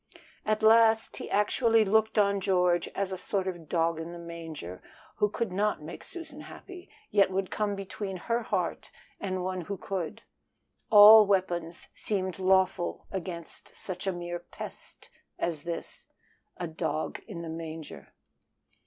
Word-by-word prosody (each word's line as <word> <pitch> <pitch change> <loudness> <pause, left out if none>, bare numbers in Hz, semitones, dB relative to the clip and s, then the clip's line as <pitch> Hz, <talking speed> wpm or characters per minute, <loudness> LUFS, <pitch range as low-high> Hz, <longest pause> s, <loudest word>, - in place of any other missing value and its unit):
At 215 0 +1
last 225 0 +5
he - - -6
actually 225 +2 +3
looked 220 +2 +2
on 200 -1 +4
George 180 -2 +2
as 195 -1 -1
a 185 - -4
sort 190 0 -1
of 175 -4 -5
dog 165 -1 +1
in 165 +1 -6
the - - -7
manger, 165 - -8 0.4
who 210 - +3
could 230 -1 -2
not 205 -2 0
make 155 - -8
Susan 315 -4 -8
happy, 365 +2 -11 0.2
yet 200 -2 +5
would 190 0 -2
come 210 -1 -1
between 195 0 -5
her 230 +6 -1
heart 190 -6 -2 0.3
and 185 -2 -2
one 185 0 -2
who 200 +4 -5
could. 180 -6 -4 0.7
All 210 0 +10
weapons 175 -4 -1
seemed 190 -3 -2
lawful 185 -2 +2
against 170 -3 -6
such 185 0 -4
a - - +3
mere 175 -1 -4
pest - - -10 0.3
as 165 -3 -2
this 170 -1 -6 0.5
a 180 - -3
dog 160 -1 -3
in 175 -7 -6
the - - -6
manger. 160 -1 -7
190 Hz, 150 wpm, -29 LUFS, 170-210 Hz, 0.7 s, All